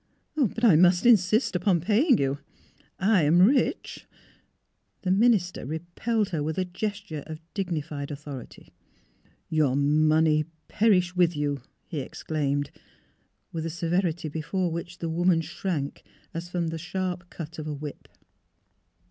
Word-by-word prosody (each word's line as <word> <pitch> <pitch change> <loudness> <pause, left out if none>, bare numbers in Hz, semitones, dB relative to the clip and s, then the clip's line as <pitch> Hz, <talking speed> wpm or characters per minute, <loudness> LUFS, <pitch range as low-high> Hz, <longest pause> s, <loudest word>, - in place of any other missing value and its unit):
'' - - -48
But 245 -5 0
I 215 -9 +7
must 175 +4 +5
insist 215 -2 +4
upon 180 0 +2
paying 225 - +3
you. 140 +1 0 0.6
I 195 -1 +3
am 155 +3 +4
rich 245 +9 +2 0.5
" - - -48
The 185 - +1
minister 200 -3 +3
repelled 175 - -2
her 165 -5 -2
with 155 +1 -2
a 185 - +1
gesture 200 -3 -4
of 155 -1 -7
dignified 155 -7 -3
authority. 145 -3 -9 0.4
'' - - -39 0.3
Your 150 -5 +2
money 155 +2 +3 0.2
perish 190 -5 +2
with 175 -2 +3
you! 145 -2 -1
" - - -46
he 160 - -4
exclaimed, 145 0 -2 0.8
with 165 -1 -4
a 165 - -2
severity 175 0 -1
before 160 +4 -2
which 170 +2 -5
the 165 - -4
woman 175 +1 +3
shrank 165 -2 -3 0.3
as 170 +1 -5
from 175 -2 -1
the 165 0 -4
sharp 180 +1 -4
cut 165 0 -8
of 155 - -5
a 150 - -3
whip. 145 0 -8
170 Hz, 150 wpm, -26 LUFS, 155-185 Hz, 0.8 s, I